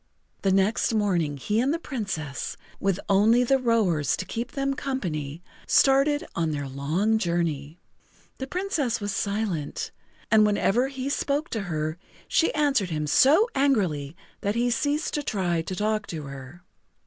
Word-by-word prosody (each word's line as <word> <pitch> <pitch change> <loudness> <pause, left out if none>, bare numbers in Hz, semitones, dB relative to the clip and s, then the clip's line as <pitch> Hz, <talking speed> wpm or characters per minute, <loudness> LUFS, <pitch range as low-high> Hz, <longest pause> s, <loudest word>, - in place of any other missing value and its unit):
The 195 - +2
next 195 +4 +2
morning 175 -9 +1
he 210 - 0
and 260 +4 +2
the 330 - 0
Princess, 195 - -4 0.2
with 195 -1 0
only 215 +5 +4
the 270 +2 +3
rowers 215 - +2
to 185 - -4
keep 235 +5 -5
them 275 0 0
company, 170 - -4 0.2
started 275 +2 +4
on 165 -1 0
their 145 -2 -3
long 160 +12 0
journey. 170 -5 -1 0.6
The 265 - -4
Princess 320 - -1
was 205 -1 -3
silent, 200 -8 -2 0.4
and 220 -1 +6
whenever 210 +4 +2
he 270 -1 -5
spoke 285 +2 -1
to 225 - -2
her 155 +1 -2 0.3
she 330 - +2
answered 280 -10 +2
him 155 -2 -2
so 295 - +5
angrily 180 - +1 0.2
that 205 +2 -1
he 240 +1 +1
ceased 290 +6 0
to 295 - 0
try 180 - -1
to 185 +3 -5
talk 215 +2 -1
to 160 -3 -5
her. 140 +4 -10
205 Hz, 155 wpm, -26 LUFS, 165-260 Hz, 0.6 s, and